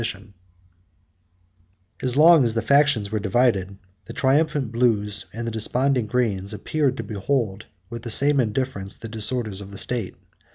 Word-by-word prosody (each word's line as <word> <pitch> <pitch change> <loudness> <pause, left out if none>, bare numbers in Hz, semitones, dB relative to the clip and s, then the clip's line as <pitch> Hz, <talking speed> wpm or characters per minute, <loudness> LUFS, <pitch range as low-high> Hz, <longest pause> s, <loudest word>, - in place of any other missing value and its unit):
] - - -3 2.0
As 130 0 -1
long 160 -1 +7
as 115 -2 -1
the 115 - 0
factions 140 -5 +3
were 110 - -1
divided, 100 -2 +1 0.3
the 115 - -9
triumphant 140 -2 +1
blues, 105 -5 +1
and 115 +3 -5
desponding 125 +2 0
greens, 105 -5 -1
appeared 135 +5 -1
to - - -4
behold 110 -1 -2 0.2
with 115 0 -6
the 120 - -7
same 140 +5 +2
indifference 110 -4 -2
the 115 - -8
disorders 110 -2 -1
of 100 - -9
the 100 - -10
state. 115 -1 -3
115 Hz, 150 wpm, -23 LUFS, 105-130 Hz, 2.0 s, long